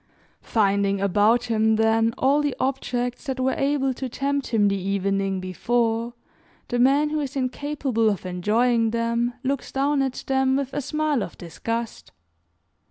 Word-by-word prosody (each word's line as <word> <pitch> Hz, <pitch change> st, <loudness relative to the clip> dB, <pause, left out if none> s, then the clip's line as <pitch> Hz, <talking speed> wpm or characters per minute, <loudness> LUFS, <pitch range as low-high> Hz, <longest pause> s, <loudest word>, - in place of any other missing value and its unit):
Finding 200 Hz, -2 st, +1 dB
about 205 Hz, +5 st, +3 dB
him, 220 Hz, -2 st, +2 dB
then, 225 Hz, +1 st, +2 dB
all 280 Hz, +3 st, +3 dB
the 290 Hz, -2 st, -1 dB
objects 250 Hz, -2 st, -2 dB
that 265 Hz, -1 st, -3 dB
were 260 Hz, +1 st, +1 dB
able 275 Hz, -1 st, 0 dB
to 260 Hz, +1 st, -5 dB
tempt 280 Hz, +2 st, -2 dB
him 210 Hz, -3 st, +2 dB
the 200 Hz, -, +1 dB
evening 195 Hz, 0 st, -1 dB
before, 230 Hz, +5 st, -1 dB, 0.5 s
the 245 Hz, -, -1 dB
man 280 Hz, +4 st, +3 dB
who 310 Hz, -, 0 dB
is 280 Hz, -2 st, -4 dB
incapable 260 Hz, -3 st, 0 dB
of 200 Hz, -3 st, -3 dB
enjoying 225 Hz, +6 st, +1 dB
them, 235 Hz, +1 st, -1 dB
looks 275 Hz, 0 st, -2 dB
down 275 Hz, +1 st, +1 dB
at 265 Hz, -2 st, -2 dB
them 265 Hz, 0 st, +2 dB
with 275 Hz, -1 st, -2 dB
a 290 Hz, -, -1 dB
smile 300 Hz, -1 st, 0 dB
of -, -, -6 dB
disgust. 230 Hz, +7 st, -5 dB
240 Hz, 155 wpm, -24 LUFS, 215-270 Hz, 0.5 s, about